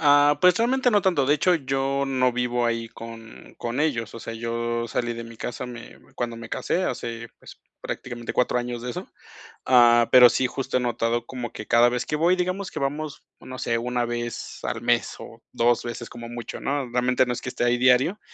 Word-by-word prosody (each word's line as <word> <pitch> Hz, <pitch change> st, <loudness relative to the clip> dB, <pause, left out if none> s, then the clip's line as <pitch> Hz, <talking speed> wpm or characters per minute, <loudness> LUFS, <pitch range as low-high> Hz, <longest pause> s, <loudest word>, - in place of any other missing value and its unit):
Ah, 145 Hz, -1 st, +5 dB
pues 180 Hz, 0 st, +6 dB
realmente 245 Hz, +1 st, +2 dB
no 205 Hz, -1 st, +4 dB
tanto, 175 Hz, -8 st, +2 dB
de 145 Hz, -, +4 dB
hecho, 175 Hz, +4 st, +3 dB
yo 135 Hz, -1 st, -1 dB
no 130 Hz, -2 st, +2 dB
vivo 125 Hz, 0 st, 0 dB
ahí 115 Hz, -1 st, -1 dB
con 115 Hz, -1 st, -11 dB
con 120 Hz, +4 st, -3 dB
ellos, 125 Hz, -8 st, -1 dB
o 115 Hz, -, -7 dB
sea, -, -, -6 dB
yo 115 Hz, +1 st, -2 dB
salí 120 Hz, 0 st, -2 dB
de 115 Hz, 0 st, -6 dB
mi 115 Hz, 0 st, -11 dB
casa 120 Hz, +2 st, -5 dB
me 120 Hz, -1 st, -10 dB, 0.2 s
cuando 120 Hz, -1 st, -3 dB
me 115 Hz, 0 st, -9 dB
casé 185 Hz, +9 st, -1 dB
hace, 115 Hz, -3 st, -4 dB
pues -, -, -14 dB, 0.2 s
prácticamente 120 Hz, -2 st, -5 dB
cuatro 125 Hz, 0 st, +1 dB
años 120 Hz, -1 st, -4 dB
de 125 Hz, -, -4 dB
eso, -, -, -6 dB, 0.6 s
ah, 120 Hz, -2 st, +6 dB
pero 125 Hz, -1 st, +9 dB
sí 130 Hz, -, +1 dB
justo 130 Hz, +1 st, -2 dB
he -, -, +1 dB
notado 120 Hz, -1 st, -1 dB
como 125 Hz, -3 st, -5 dB
que 110 Hz, -, -8 dB
cada 120 Hz, +1 st, +5 dB
vez 125 Hz, 0 st, -2 dB
que -, -, -1 dB
voy, 170 Hz, +4 st, +3 dB
digamos 185 Hz, +2 st, -2 dB
que -, -, -5 dB
vamos, 145 Hz, +2 st, -3 dB, 0.2 s
no 130 Hz, 0 st, -9 dB
sé, 115 Hz, -, 0 dB
una 120 Hz, +1 st, -1 dB
vez 120 Hz, 0 st, -5 dB
al -, -, -3 dB
mes -, -, +1 dB
o -, -, -11 dB
dos 120 Hz, 0 st, +2 dB
veces 120 Hz, 0 st, -6 dB
como 120 Hz, 0 st, -9 dB
mucho, 120 Hz, -1 st, -7 dB
¿no?, 140 Hz, -2 st, -2 dB
realmente 125 Hz, +1 st, +2 dB
no 125 Hz, -, 0 dB
es -, -, -6 dB
que 130 Hz, -, -4 dB
esté -, -, -3 dB
ahí 120 Hz, 0 st, +3 dB
diario, 130 Hz, +10 st, +3 dB
125 Hz, 215 wpm, -24 LUFS, 120-135 Hz, 0.6 s, pero